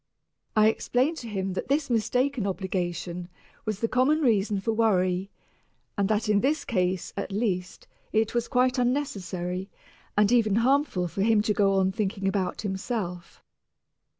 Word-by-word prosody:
I 215 Hz, 0 st, +6 dB
explained 255 Hz, +7 st, +1 dB
to 235 Hz, -, -7 dB
him 195 Hz, -2 st, -2 dB
that -, -, -4 dB
this 280 Hz, +2 st, +1 dB
mistaken 245 Hz, 0 st, 0 dB
obligation 180 Hz, -2 st, -3 dB, 0.4 s
was 215 Hz, -2 st, -3 dB
the 230 Hz, -, +2 dB
common 265 Hz, +6 st, +2 dB
reason 215 Hz, -6 st, +2 dB
for 210 Hz, +4 st, -1 dB
worry, 190 Hz, -4 st, +1 dB, 0.7 s
and 200 Hz, -1 st, 0 dB
that 215 Hz, +1 st, +1 dB
in 210 Hz, -1 st, +3 dB
this 295 Hz, +4 st, 0 dB
case, 185 Hz, -5 st, -1 dB
at -, -, -4 dB
least, 190 Hz, -4 st, -2 dB, 0.2 s
it 220 Hz, 0 st, +1 dB
was 240 Hz, -1 st, 0 dB
quite 255 Hz, +1 st, +2 dB
unnecessary 190 Hz, -, -2 dB, 0.5 s
and 210 Hz, +1 st, +4 dB
even 220 Hz, -4 st, +3 dB
harmful 240 Hz, -6 st, +2 dB
for 195 Hz, -, -4 dB
him 215 Hz, 0 st, +3 dB
to 210 Hz, -, +1 dB
go 200 Hz, -1 st, +3 dB
on 190 Hz, 0 st, +2 dB
thinking 195 Hz, 0 st, -2 dB
about 195 Hz, -1 st, -1 dB
himself. 190 Hz, -3 st, -4 dB
210 Hz, 150 wpm, -27 LUFS, 190-240 Hz, 0.7 s, I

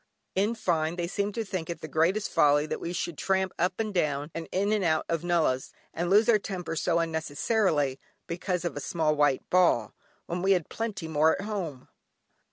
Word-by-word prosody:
In 205 Hz, +5 st, +1 dB
fine, 165 Hz, -6 st, 0 dB
they 175 Hz, -1 st, -2 dB
seemed 200 Hz, +3 st, -2 dB
to 225 Hz, -1 st, -2 dB
think 185 Hz, -5 st, -4 dB
it 170 Hz, -, -5 dB
the -, -, -5 dB
greatest 170 Hz, +8 st, +1 dB
folly 145 Hz, -2 st, +4 dB
that -, -, -4 dB
we 170 Hz, -, -3 dB
should 170 Hz, -2 st, -3 dB
tramp 190 Hz, -1 st, 0 dB
up 180 Hz, +3 st, 0 dB
and 215 Hz, -2 st, -1 dB
down, 150 Hz, -3 st, 0 dB
and 165 Hz, -1 st, -6 dB
in 200 Hz, +3 st, +1 dB
and 210 Hz, -2 st, +1 dB
out 160 Hz, -2 st, +1 dB
of 165 Hz, -1 st, -1 dB
nullahs, 165 Hz, -7 st, +1 dB, 0.2 s
and 175 Hz, +1 st, -2 dB
lose 210 Hz, +3 st, +5 dB
our 225 Hz, -3 st, +5 dB
tempers 180 Hz, -5 st, -4 dB
so 170 Hz, -1 st, +2 dB
unnecessarily, 160 Hz, -, 0 dB, 0.3 s
because 180 Hz, +1 st, -2 dB
of 170 Hz, -, -2 dB
a -, -, -3 dB
small 155 Hz, 0 st, 0 dB
white 145 Hz, -3 st, +2 dB
ball, 170 Hz, -, +3 dB, 0.3 s
when 175 Hz, +1 st, -3 dB
we 195 Hz, +1 st, +4 dB
had 175 Hz, -4 st, -1 dB
plenty 215 Hz, -7 st, -4 dB
more 160 Hz, 0 st, +3 dB
at -, -, -3 dB
home. 175 Hz, -11 st, -4 dB
170 Hz, 200 wpm, -28 LUFS, 155-195 Hz, 0.3 s, lose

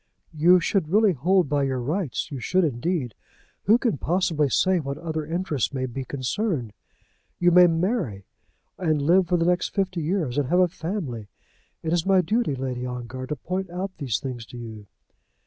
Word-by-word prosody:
"You 175 Hz, +4 st, +5 dB
should 170 Hz, -2 st, 0 dB
really 210 Hz, +1 st, +4 dB
hold 180 Hz, +5 st, +2 dB
by 145 Hz, 0 st, +1 dB
your 135 Hz, -2 st, 0 dB
rights; 150 Hz, +4 st, -2 dB
you 140 Hz, -, -4 dB
should, 185 Hz, +9 st, +1 dB
indeed. 140 Hz, -, -1 dB, 0.5 s
Who 220 Hz, +4 st, +6 dB
can 235 Hz, -, -1 dB
possibly 165 Hz, -4 st, +1 dB
say 185 Hz, +7 st, +2 dB
what 140 Hz, -2 st, -4 dB
other 160 Hz, -1 st, -3 dB
interests 160 Hz, -, -1 dB
may 130 Hz, -1 st, -1 dB
be 130 Hz, +1 st, -5 dB
concerned? 140 Hz, -, -2 dB, 0.6 s
You 175 Hz, 0 st, +3 dB
may 180 Hz, +1 st, +8 dB
marry, 165 Hz, -, -1 dB, 0.5 s
and 160 Hz, -5 st, +1 dB
live 175 Hz, +5 st, +3 dB
for 180 Hz, 0 st, +2 dB
the 165 Hz, -, +1 dB
next 180 Hz, 0 st, 0 dB
fifty 185 Hz, -3 st, 0 dB
years, 155 Hz, -5 st, -1 dB
and 135 Hz, -3 st, -1 dB
have 180 Hz, +3 st, +3 dB
a 180 Hz, -, +5 dB
family. 160 Hz, -, -5 dB, 0.6 s
It 160 Hz, 0 st, -1 dB
is 175 Hz, -2 st, +2 dB
my 190 Hz, -1 st, +5 dB
duty, 195 Hz, -, 0 dB
Lady 130 Hz, -1 st, -4 dB
Ongar, 125 Hz, +1 st, -5 dB
to 150 Hz, -, -2 dB
point 185 Hz, +6 st, -4 dB
out 180 Hz, +2 st, -4 dB
these 130 Hz, -, -1 dB
things 125 Hz, -3 st, -5 dB
to 125 Hz, -, -10 dB
you." 110 Hz, -3 st, -9 dB
160 Hz, 180 wpm, -25 LUFS, 130-185 Hz, 0.6 s, may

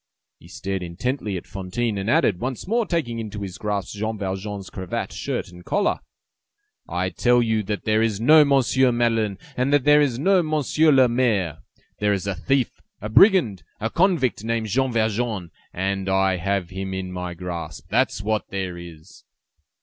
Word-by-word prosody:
He -, -, -16 dB
stared 95 Hz, 0 st, -4 dB
intently 100 Hz, +4 st, -3 dB
at 85 Hz, -, -8 dB
Fantine, 100 Hz, +3 st, -3 dB
and 95 Hz, +3 st, -3 dB
added, 90 Hz, -, +3 dB
once 130 Hz, -, -4 dB
more 230 Hz, +2 st, +1 dB
taking 130 Hz, -10 st, -1 dB
into 105 Hz, -2 st, -5 dB
his 95 Hz, -2 st, -7 dB
grasp 105 Hz, -2 st, -3 dB
Jean 110 Hz, +2 st, -3 dB
Valjean's 95 Hz, 0 st, -5 dB
cravat, 95 Hz, -2 st, -4 dB
shirt -, -, -3 dB
and 90 Hz, 0 st, -13 dB
collar:— 200 Hz, -, 0 dB, 0.9 s
"I -, -, -1 dB
tell 125 Hz, -1 st, +3 dB
you 110 Hz, -2 st, +1 dB
that 105 Hz, 0 st, -4 dB
there 110 Hz, 0 st, +2 dB
is 110 Hz, -3 st, 0 dB
no 150 Hz, +7 st, +7 dB
Monsieur 135 Hz, -2 st, +3 dB
Madeleine 115 Hz, -4 st, +1 dB, 0.2 s
and 130 Hz, +2 st, 0 dB
that 145 Hz, -2 st, +3 dB
there 150 Hz, +1 st, +6 dB
is 130 Hz, -5 st, +1 dB
no 185 Hz, +7 st, +3 dB
Monsieur 155 Hz, 0 st, +2 dB
le 130 Hz, -2 st, +6 dB
Maire. 110 Hz, -, 0 dB, 0.4 s
There 105 Hz, 0 st, +2 dB
is 100 Hz, -1 st, -2 dB
a 100 Hz, -, -1 dB
thief, 130 Hz, -, -1 dB, 0.2 s
a 105 Hz, -, -5 dB
brigand, 140 Hz, -, +5 dB, 0.2 s
a 110 Hz, +1 st, -2 dB
convict 170 Hz, -, +1 dB
named 115 Hz, -1 st, -1 dB
Jean 130 Hz, +4 st, +1 dB
Valjean! 110 Hz, -5 st, -1 dB, 0.2 s
And 95 Hz, +1 st, -2 dB
I 95 Hz, -1 st, +2 dB
have 95 Hz, 0 st, -2 dB
him 95 Hz, 0 st, -4 dB
in 95 Hz, -1 st, -4 dB
my 90 Hz, -1 st, -5 dB
grasp! 85 Hz, -3 st, -6 dB
That's 100 Hz, -, +1 dB
what 110 Hz, 0 st, -1 dB
there 95 Hz, -3 st, -4 dB
is!" 85 Hz, +1 st, -13 dB
110 Hz, 175 wpm, -23 LUFS, 95-125 Hz, 0.9 s, no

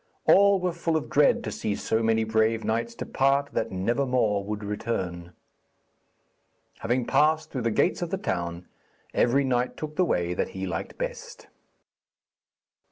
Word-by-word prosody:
All 200 Hz, 0 st, +6 dB
were 180 Hz, -1 st, -1 dB
full 165 Hz, -1 st, 0 dB
of 155 Hz, -, -6 dB
dread 145 Hz, 0 st, +4 dB
to 105 Hz, -, -4 dB
see 105 Hz, 0 st, -2 dB
so 110 Hz, -, -1 dB
many 110 Hz, 0 st, +2 dB
brave 110 Hz, 0 st, +1 dB
knights 115 Hz, +1 st, -1 dB
depart 140 Hz, +3 st, +1 dB
that -, -, -1 dB
never 115 Hz, +9 st, 0 dB
more 110 Hz, -6 st, +1 dB
would 105 Hz, +1 st, -5 dB
return. 95 Hz, -5 st, -4 dB, 1.5 s
Having 120 Hz, +2 st, 0 dB
passed 155 Hz, +4 st, +2 dB
through 130 Hz, -, -3 dB
the 115 Hz, -, +1 dB
gates 170 Hz, -, +1 dB
of 175 Hz, -, -2 dB
the 195 Hz, -, -1 dB
town, 85 Hz, -, -3 dB, 0.5 s
every 135 Hz, +4 st, +3 dB
knight 125 Hz, -1 st, 0 dB
took 155 Hz, -1 st, -6 dB
the 185 Hz, -, +4 dB
way 90 Hz, -, 0 dB
that -, -, -2 dB
he 95 Hz, -, -3 dB
liked 85 Hz, -3 st, -5 dB
best. -, -, -6 dB
115 Hz, 160 wpm, -26 LUFS, 105-140 Hz, 1.5 s, All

